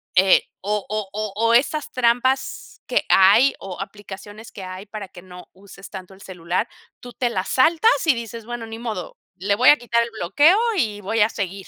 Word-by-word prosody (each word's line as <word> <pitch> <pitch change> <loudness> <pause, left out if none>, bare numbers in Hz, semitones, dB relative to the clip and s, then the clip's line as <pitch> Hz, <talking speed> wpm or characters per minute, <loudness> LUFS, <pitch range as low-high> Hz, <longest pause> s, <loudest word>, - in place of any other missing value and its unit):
Eh, 190 +1 +5 0.2
o 205 0 -2
o 215 -1 -3
o 215 -1 -3
o 230 +2 +2
estas 290 +5 +1
trampas 255 +2 -1
que - - 0
hay 210 +8 +6
o 190 -2 -8
aplicaciones 205 +2 -10
que 195 - -9
hay 185 +1 -8
para 205 -1 -7
que 175 - -14
no 180 0 -13
uses 195 0 -14
tanto 190 -1 -10
el 190 - -19
celular, 180 +3 -3 0.3
¿tú 245 0 -11
te 245 -1 -1
las 190 -5 -3
saltas?, 330 - +4
y 315 - +5
dices 230 0 -7
bueno, 240 0 -6
ni 225 0 -8
modo, 220 -7 -6 0.2
le 200 +3 0
voy 245 +5 +5
a 295 - +7
quitar 235 -2 0
el 235 - -6
bloqueo 290 - +4 0.2
y 215 - -1
voy 225 +3 -1
a 210 - +4
seguir. 195 -3 -5
210 Hz, 200 wpm, -21 LUFS, 190-240 Hz, 0.3 s, a